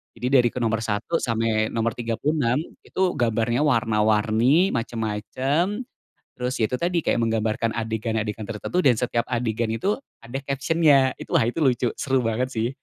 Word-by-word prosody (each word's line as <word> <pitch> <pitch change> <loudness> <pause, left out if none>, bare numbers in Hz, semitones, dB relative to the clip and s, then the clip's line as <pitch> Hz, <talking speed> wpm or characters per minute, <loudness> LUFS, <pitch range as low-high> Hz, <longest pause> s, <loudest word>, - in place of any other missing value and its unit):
Jadi 120 +2 -3
dari 125 -3 +5
ke 125 - -4
nomor 115 0 +1
satu 110 +9 -1
sampai 110 -2 0
nomor 115 0 -1
36 120 +3 0 0.2
itu - - -5 0.2
gambarnya 115 +1 +1
warna-warni 115 - +3
macem-macem. 130 - -1 0.5
Terus 125 +1 -2
itu 110 +4 +1
tadi 170 +3 0
kayak - - 0
menggambarkan 110 0 0
adegan-adegan 110 -1 -2
tertentu 115 - -4
dan 130 - +6
setiap 120 -1 0
adegan 115 -1 -1
itu 195 - 0 0.2
ada 120 +3 -7
caption-nya 140 -1 +3
itu - - -10
wah - - +4
itu 125 - -4
lucu 125 -2 +2
seru 135 -1 +1
banget 125 +3 -1
sih. 115 0 0
115 Hz, 150 wpm, -24 LUFS, 110-135 Hz, 0.5 s, dan